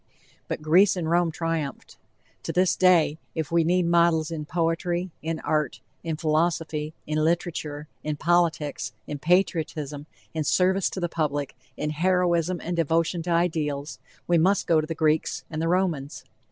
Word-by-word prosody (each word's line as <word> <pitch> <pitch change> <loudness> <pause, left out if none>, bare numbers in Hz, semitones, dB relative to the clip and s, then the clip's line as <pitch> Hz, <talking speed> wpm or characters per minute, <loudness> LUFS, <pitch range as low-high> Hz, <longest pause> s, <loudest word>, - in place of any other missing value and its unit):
But 155 - -4
Greece 185 +6 +5
and 175 -3 -2
Rome 175 0 +3
triumphed. 165 -3 -4 0.5
To - - -4
this 180 0 +2
day, 170 -4 +4 0.2
if 160 -2 -3
we 170 0 +3
need 180 +2 +2
models 170 -1 +3
in 155 -2 -4
poetry, 170 +2 -1
in 160 +1 -3
art, 150 -4 -1 0.2
in 160 -2 -3
philosophy, 155 -1 0
in 155 0 0
literature, 155 -3 -2 0.2
in 150 0 -2
politics, 165 -2 0
in 145 - -5
patriotism, 155 -4 0 0.3
in 160 -1 -1
service 185 +4 +2
to - - -5
the 175 - 0
public, 145 -4 -2 0.2
in 150 0 -2
heroism 175 +1 +1
and 175 +1 -2
devotion 165 +1 +1
to 170 - -5
ideals 160 -4 -1 0.3
we 175 -1 +3
must 190 +4 +3
go 160 -2 +3
to 155 - -6
the 165 - -4
Greeks 155 0 +1
and 155 0 -3
the 165 - 0
Romans. 170 -6 -1
165 Hz, 160 wpm, -25 LUFS, 155-175 Hz, 0.5 s, Greece